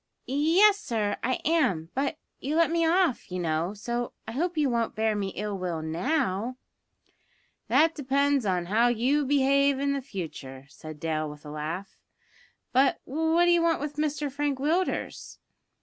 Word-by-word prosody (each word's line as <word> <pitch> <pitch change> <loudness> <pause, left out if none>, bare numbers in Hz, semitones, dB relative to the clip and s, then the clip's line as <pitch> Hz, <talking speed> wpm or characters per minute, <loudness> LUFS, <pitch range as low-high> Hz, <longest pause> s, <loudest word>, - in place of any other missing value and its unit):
"Yes, 340 +10 +4
sir, 215 - -1
I 255 +1 0
am; 245 - +1
but 280 +3 -1 0.2
you 290 +3 -2
let 330 0 +3
me 335 -1 +2
off, 335 - +1
you 180 - -3
know, 170 +2 -1
so 240 +3 -3
I - - -4
hope 330 +7 -2
you 295 -2 +3
won't 235 -3 -1
bear 220 0 +1
me 200 -1 -1
ill 210 +1 -3
will 170 -3 -3
now." 215 - -1 1.1
"That 325 +1 +4
depends 280 -1 +1
on 180 -4 0
how 220 +6 +3
you 250 +5 +2
behave 275 0 +3
in 280 0 0
future," 155 - -7
said 155 0 -10
Dale 155 -1 -2
with 150 0 -12
a 150 - -7
laugh; 160 +6 -5 0.7
"but 265 +2 +3
what 320 +5 +2
d'you 345 -1 +4
want 335 -1 +2
with 295 0 -4 0.4
Frank 290 -1 -1
Willders?" 325 +7 -2
255 Hz, 155 wpm, -27 LUFS, 185-295 Hz, 1.1 s, Yes